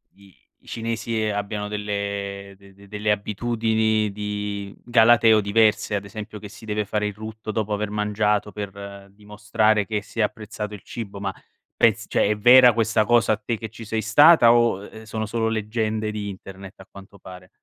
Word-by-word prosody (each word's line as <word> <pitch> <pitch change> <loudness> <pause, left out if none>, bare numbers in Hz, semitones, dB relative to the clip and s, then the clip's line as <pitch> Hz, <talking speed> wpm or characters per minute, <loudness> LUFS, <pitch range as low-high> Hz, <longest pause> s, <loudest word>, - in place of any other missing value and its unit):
i 100 -2 -22 0.2
i - - -22
cinesi 115 0 -3
abbiano 105 0 -3
delle 100 -1 -4
de 100 -1 -19
de 100 +1 -18
delle 105 +1 -1
abitudini 110 0 0
di 105 -1 -5
galateo 115 -2 +5
diverse, 105 +1 +2
ad 100 - -3
esempio 105 +1 -8
che 105 0 -10
si 110 +1 -13
deve 105 -1 -2
fare 105 +1 -2
il 105 - -3
rutto 110 +1 -7
dopo 110 0 -3
aver 105 0 -2
mangiato, 105 0 0
per 100 -1 -8
dimostrare 105 +1 0
che 105 -2 -2
si 115 - -10
è - - +4
apprezzato 105 0 -5
il 100 - -9
cibo, 100 -4 -8
ma 95 -1 -3 0.4
pez - - +2
cioè, - - +1
è 105 - +1
vera 125 +2 +7
questa 115 -1 +1
cosa 115 -2 +3
te 115 0 -4
che 110 0 -7
ci 115 0 -11
sei 110 +1 -2
stata 120 +3 +6
o, 120 -5 +2
ehm, 110 - -12
sono 110 0 -4
solo 115 +1 -1
leggende 110 0 -2
di 105 -1 -5
internet 95 0 -10
a 95 - -14
quanto 100 0 -14
pare? 90 0 -12
105 Hz, 180 wpm, -23 LUFS, 100-110 Hz, 0.4 s, vera